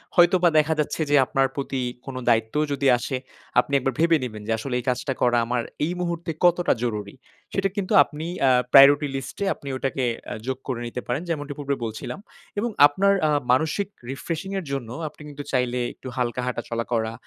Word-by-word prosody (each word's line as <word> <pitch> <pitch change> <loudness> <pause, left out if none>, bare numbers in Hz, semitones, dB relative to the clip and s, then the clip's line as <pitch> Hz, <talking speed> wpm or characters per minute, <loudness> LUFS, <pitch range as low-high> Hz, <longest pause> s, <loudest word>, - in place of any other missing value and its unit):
হয়তোবা 175 0 +5
দেখা 155 +1 +4
যাচ্ছে 150 +2 -1
যে 145 - +4
আপনার 135 +1 +1
প্রতি 135 -2 -3 0.2
কোন 135 - -7
দায়িত্বও 115 +6 +2
যদি 140 -1 0
আসে, 130 +1 -3 0.4
আপনি 140 - -1
একবার 135 0 -1
ভেবে 165 -1 +4
নিবেন 110 -4 -5
যে, - - -1
"আসলে 125 +3 -4
এই 125 - -8
কাজটা 125 +2 -1
করা 120 -1 +3
আমার 120 0 0 0.2
এই 170 - -2
মুহূর্তে 170 -1 -2
কতটা 175 0 +4
জরুরি?" 105 -4 -3 0.4
সেটা 195 0 +1
কিন্তু 200 -3 -2
আপনি 150 +2 -8 0.2
আ - - +6 0.2
প্রায়োরিটি 145 +2 +8
লিস্টে 135 +9 -5
আপনি 140 - -13
ওটাকে 135 0 -2 0.3
আ - - -2
যোগ 130 -1 -1
করে 125 -3 -2
নিতে 125 +1 -5
পারেন 125 +6 -1
যেমনটি 145 -3 -3
পূর্বে 140 -1 -1
বলছিলাম। 110 - -6 0.4
এবং 235 +2 0 0.2
আপনার 195 +7 +2
আ - - +2 0.2
মানসিক 160 +9 +1 0.2
রিফ্রেশিং 165 +6 -4
এর 180 - -8
জন্য 130 -5 -3 0.2
আপনি 150 - -12
কিন্তু 145 0 -7
চাইলে 125 -1 0
একটু - - -11
হালকা 125 0 -1
হাঁটা-চলা 115 -2 -3
করা। 110 -1 0
140 Hz, 190 wpm, -24 LUFS, 125-160 Hz, 0.4 s, প্রায়োরিটি